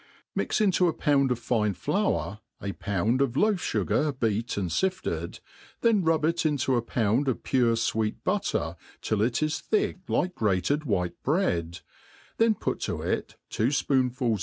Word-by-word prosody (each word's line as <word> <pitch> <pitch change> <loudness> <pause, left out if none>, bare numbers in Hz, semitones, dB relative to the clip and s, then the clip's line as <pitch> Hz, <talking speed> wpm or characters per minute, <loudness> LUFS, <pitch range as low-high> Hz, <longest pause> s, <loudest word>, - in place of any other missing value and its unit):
\ - - -39
MIX - - 0
into 185 -3 +3
a 165 - +1
pound 140 -3 +2
of 125 - +1
fine 110 -4 0
flour, 190 - -1 0.2
a 100 - -3
pound 105 +6 0
of 135 -2 0
loaf 210 0 +3
fngar 145 -3 0
be«t 110 -1 0
I - - -1
and 90 -3 -2
fifted, 185 - -1 0.4
then 225 -4 +4
rub 160 -2 +2
it 170 +1 +1
into 145 -4 +1
9l 120 -2 +1
pound 115 +4 +1
of 130 - -1
pure 120 -3 +2
fweet 110 -1 0
butter - - -1 0.3
tiH 110 -1 +1
it 125 +4 -1
is 155 +1 0
thick 215 -3 0
like 180 0 0
grated 110 - 0
white 90 -7 -1
bre^d, 90 - 0 0.6
then 225 -1 +4
put - - -2
to - - -3
it - - -2 0.2
two 110 - +1
fpoonfuls 130 -4 +1
130 Hz, 170 wpm, -27 LUFS, 110-155 Hz, 0.6 s, then